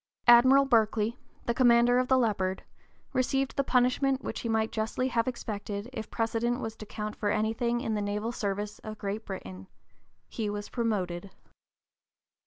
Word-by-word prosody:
Admiral 260 Hz, +3 st, +7 dB
Berkeley, 225 Hz, -1 st, +2 dB, 0.3 s
the 235 Hz, -, +1 dB
commander 240 Hz, 0 st, +5 dB
of 255 Hz, -, 0 dB
the 260 Hz, -, +4 dB
Leopard, 195 Hz, -6 st, 0 dB, 0.5 s
received 270 Hz, +1 st, 0 dB
the 275 Hz, -, +1 dB
punishment 260 Hz, +1 st, +2 dB
which -, -, -4 dB
he 230 Hz, -, -4 dB
might 220 Hz, 0 st, +1 dB
justly 225 Hz, +4 st, -1 dB
have 230 Hz, -1 st, 0 dB
expected 210 Hz, -3 st, -4 dB
if 220 Hz, -3 st, -6 dB
precedent 230 Hz, +2 st, -1 dB
was 225 Hz, -3 st, -5 dB
to 215 Hz, -, -10 dB
count 210 Hz, 0 st, -5 dB
for 205 Hz, -, -1 dB
anything 225 Hz, +3 st, 0 dB
in 225 Hz, -4 st, -2 dB
the 210 Hz, -, -1 dB
naval 210 Hz, +3 st, -2 dB
service 205 Hz, -2 st, -3 dB
of 215 Hz, -1 st, -8 dB
Great 205 Hz, +2 st, -4 dB
Britain, 95 Hz, -, -7 dB, 0.6 s
he 215 Hz, -2 st, -3 dB
was 205 Hz, 0 st, -5 dB
promoted. 200 Hz, -6 st, -2 dB
225 Hz, 160 wpm, -29 LUFS, 210-245 Hz, 0.6 s, Admiral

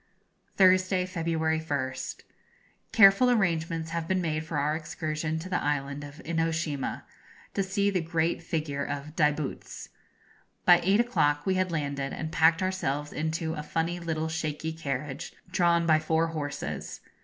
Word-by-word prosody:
Thursday, 185 Hz, -1 st, +4 dB
February 165 Hz, -3 st, 0 dB
1st. 130 Hz, -4 st, -3 dB, 0.7 s
Careful 220 Hz, +2 st, +7 dB
arrangements 165 Hz, -7 st, 0 dB
have 165 Hz, -1 st, -2 dB
been 185 Hz, +1 st, +1 dB
made 155 Hz, -3 st, -1 dB
for 160 Hz, -1 st, -4 dB
our 150 Hz, +2 st, +1 dB
excursion 155 Hz, -1 st, -3 dB
to 160 Hz, +3 st, -6 dB
the 185 Hz, -, -1 dB
Island 140 Hz, 0 st, -2 dB
of 145 Hz, +1 st, -10 dB
Inoshima, 165 Hz, -3 st, -1 dB, 0.5 s
to -, -, 0 dB
see 200 Hz, +1 st, +1 dB
the 185 Hz, -3 st, 0 dB
great 165 Hz, 0 st, 0 dB
figure 155 Hz, -4 st, -2 dB
of 145 Hz, +2 st, -5 dB
Daibutz. 150 Hz, -2 st, -1 dB, 0.8 s
By 175 Hz, -1 st, +7 dB
eight 195 Hz, +4 st, +3 dB
o'clock 145 Hz, -12 st, +2 dB
we 190 Hz, -, +2 dB
had 185 Hz, -1 st, 0 dB
landed, 140 Hz, -3 st, -2 dB
and 155 Hz, 0 st, -4 dB
packed 165 Hz, +3 st, +4 dB
ourselves 150 Hz, -6 st, -2 dB
into 160 Hz, +1 st, -2 dB
a 155 Hz, -, -4 dB
funny 165 Hz, +3 st, -2 dB
little 160 Hz, -2 st, -2 dB
shaky 160 Hz, 0 st, -3 dB
carriage, 140 Hz, -1 st, -4 dB, 0.2 s
drawn 170 Hz, -2 st, +3 dB
by 155 Hz, -1 st, +5 dB
four 160 Hz, +1 st, +1 dB
horses. 150 Hz, -3 st, -5 dB
160 Hz, 145 wpm, -28 LUFS, 150-175 Hz, 0.8 s, Careful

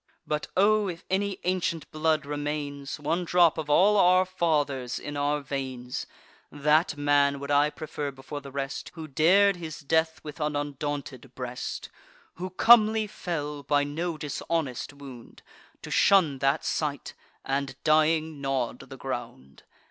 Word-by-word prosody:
But, 150 Hz, 0 st, -2 dB
O! 210 Hz, +1 st, +4 dB
if 170 Hz, -2 st, -6 dB
any 195 Hz, 0 st, 0 dB
ancient 175 Hz, -3 st, -1 dB
blood 155 Hz, -1 st, +1 dB
remains, 145 Hz, -1 st, -4 dB
One 160 Hz, +5 st, -1 dB
drop 170 Hz, -2 st, +4 dB
of 150 Hz, -1 st, -5 dB
all 200 Hz, +8 st, +5 dB
our 185 Hz, 0 st, +5 dB
fathers', 145 Hz, -8 st, 0 dB
in 145 Hz, -, -6 dB
our 145 Hz, +1 st, 0 dB
veins, 130 Hz, -3 st, -5 dB, 0.4 s
That 150 Hz, +2 st, +2 dB
man 145 Hz, -1 st, +3 dB
would 140 Hz, +1 st, -5 dB
I 145 Hz, +1 st, +4 dB
prefer 150 Hz, -1 st, -5 dB
before 135 Hz, +2 st, -8 dB
the 140 Hz, -, -9 dB
rest, 135 Hz, +1 st, -4 dB
Who 160 Hz, -2 st, -7 dB
dar'd 180 Hz, +7 st, +4 dB
his 160 Hz, -3 st, -7 dB
death 160 Hz, +2 st, +1 dB
with 150 Hz, +1 st, -8 dB
an 150 Hz, -1 st, -1 dB
undaunted 145 Hz, -3 st, -4 dB
breast; 125 Hz, -1 st, -5 dB, 0.5 s
Who 185 Hz, +2 st, -4 dB
comely 220 Hz, +2 st, +5 dB
fell, 150 Hz, -8 st, -4 dB
by 145 Hz, +1 st, +2 dB
no 160 Hz, +3 st, -3 dB
dishonest 150 Hz, -2 st, -3 dB
wound, 135 Hz, -4 st, -12 dB, 0.4 s
To -, -, -7 dB
shun 165 Hz, -9 st, +4 dB
that 135 Hz, +1 st, +1 dB
sight, 145 Hz, -4 st, -2 dB, 0.3 s
and, 140 Hz, 0 st, -2 dB
dying, 155 Hz, -1 st, +2 dB
gnaw'd 135 Hz, -3 st, -2 dB
the -, -, -9 dB
ground. 70 Hz, +1 st, -7 dB
150 Hz, 145 wpm, -27 LUFS, 140-165 Hz, 0.5 s, all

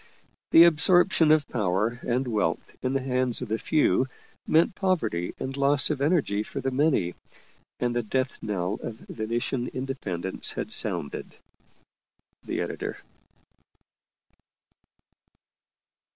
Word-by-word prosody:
The 165 Hz, -, +8 dB
absorption 170 Hz, 0 st, +5 dB
of 155 Hz, -2 st, +3 dB
power 105 Hz, +2 st, -1 dB
and 125 Hz, +2 st, -1 dB
wealth 105 Hz, -8 st, -2 dB
in 130 Hz, +1 st, -1 dB
the 135 Hz, -1 st, -1 dB
hands 125 Hz, -2 st, 0 dB
of 120 Hz, -, -7 dB
the 110 Hz, +1 st, -1 dB
few 150 Hz, -4 st, +2 dB, 0.4 s
meant 165 Hz, +3 st, +3 dB
poverty 155 Hz, -, -1 dB
and 135 Hz, 0 st, -4 dB
loss 140 Hz, +1 st, +4 dB
of 140 Hz, -3 st, -3 dB
energy 140 Hz, -, +1 dB
for -, -, -6 dB
the 135 Hz, -, -2 dB
many, 130 Hz, -, +1 dB, 0.7 s
and 120 Hz, -1 st, -1 dB
the 120 Hz, -, +1 dB
death 130 Hz, +4 st, -2 dB
knell 100 Hz, -1 st, -2 dB
of 115 Hz, -, -6 dB
Venetian 120 Hz, +3 st, -3 dB
in 130 Hz, +1 st, -5 dB
dependence 95 Hz, -9 st, -2 dB
had -, -, -5 dB
sounded. 70 Hz, -, -1 dB, 1.1 s
EDITOR. -, -, -4 dB
130 Hz, 120 wpm, -26 LUFS, 110-145 Hz, 1.1 s, The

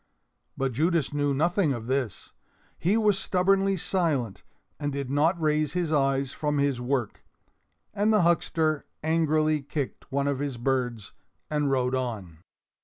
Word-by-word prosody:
But 135 Hz, -1 st, 0 dB
Judas 155 Hz, +3 st, +1 dB
knew 145 Hz, -1 st, +1 dB
nothing 165 Hz, +2 st, +2 dB
of 115 Hz, -3 st, -6 dB
this. 130 Hz, -5 st, -2 dB, 0.5 s
He 190 Hz, +6 st, +2 dB
was 210 Hz, -3 st, +3 dB
stubbornly 195 Hz, +1 st, +2 dB
silent 155 Hz, -, -1 dB, 0.4 s
and 145 Hz, -1 st, -2 dB
did 140 Hz, -1 st, -4 dB
not 160 Hz, +5 st, +2 dB
raise 155 Hz, -1 st, +1 dB
his 175 Hz, -3 st, -1 dB
eyes 135 Hz, -2 st, +1 dB
from 150 Hz, 0 st, -1 dB
his 140 Hz, -3 st, +1 dB
work, 125 Hz, -3 st, -2 dB, 0.7 s
and 210 Hz, +2 st, +2 dB
the 215 Hz, -4 st, +4 dB
huckster 160 Hz, -2 st, +1 dB, 0.2 s
angrily 155 Hz, -1 st, +2 dB
kicked 140 Hz, -1 st, -5 dB
one 140 Hz, +1 st, 0 dB
of 140 Hz, -2 st, 0 dB
his 140 Hz, -3 st, -3 dB
birds 125 Hz, -3 st, -2 dB, 0.4 s
and 150 Hz, -2 st, +1 dB
rode 130 Hz, -1 st, +1 dB
on. 110 Hz, -11 st, -3 dB
145 Hz, 145 wpm, -27 LUFS, 130-165 Hz, 0.7 s, the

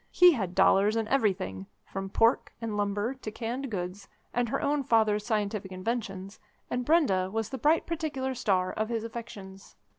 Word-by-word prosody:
He 360 Hz, 0 st, +7 dB
had 190 Hz, -, -2 dB
dollars 205 Hz, +3 st, +4 dB
in 225 Hz, -1 st, 0 dB
everything, 185 Hz, -, 0 dB, 0.2 s
from 195 Hz, 0 st, -5 dB
pork 225 Hz, +5 st, +2 dB
and 225 Hz, -2 st, -3 dB
lumber 205 Hz, +3 st, -1 dB
to 260 Hz, -5 st, -7 dB
canned 245 Hz, +5 st, -4 dB
goods, 190 Hz, -1 st, -5 dB, 0.3 s
and 245 Hz, -1 st, 0 dB
her -, -, 0 dB
own 290 Hz, 0 st, +1 dB
father's 215 Hz, -4 st, +2 dB
scientific 210 Hz, -3 st, -1 dB
inventions, 195 Hz, -1 st, -4 dB, 0.3 s
and 250 Hz, 0 st, -1 dB
Brenda 240 Hz, -, +3 dB
was 225 Hz, 0 st, -2 dB
the 265 Hz, -, -5 dB
bright 310 Hz, +6 st, +3 dB
particular 300 Hz, -6 st, -2 dB
star 190 Hz, -7 st, 0 dB
of 215 Hz, +1 st, -2 dB
his 230 Hz, -2 st, -2 dB
affections. 205 Hz, -4 st, -9 dB
220 Hz, 170 wpm, -29 LUFS, 195-250 Hz, 0.3 s, He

